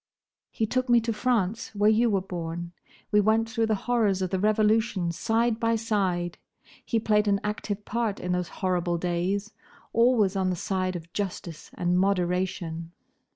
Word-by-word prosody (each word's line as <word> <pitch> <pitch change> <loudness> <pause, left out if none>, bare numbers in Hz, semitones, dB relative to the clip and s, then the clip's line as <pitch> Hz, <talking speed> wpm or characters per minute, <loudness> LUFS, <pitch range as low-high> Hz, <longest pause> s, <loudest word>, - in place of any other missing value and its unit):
"He 220 - -1
took 255 +3 -1
me 240 0 +6
to 230 0 -1
France, 225 -2 -1
where 205 +1 +3
you 230 +2 +3
were 195 -3 +1
born. 170 -2 -5 0.4
We 210 -1 +5
went 220 +2 +2
through 225 -1 0
the 220 - +2
horrors 215 -6 +2
of 185 - -2
the 190 - 0
Revolution 215 -3 +2
side 225 +5 0
by 230 0 +2
side. 190 -6 -1 0.4
He 230 - 0
played 210 -1 +2
an 200 -1 +3
active 210 -1 -3
part 230 -3 -1
in 180 - -3
those 180 -1 0 0.2
horrible 175 -2 +1
days; 180 +5 -1 0.4
always 230 -4 +3
on 190 -1 +1
the 180 - 0
side 185 +1 -2
of 170 0 -8
justice 175 -5 -5
and 180 +1 +1
moderation. 180 -3 -1
200 Hz, 165 wpm, -27 LUFS, 180-220 Hz, 0.4 s, me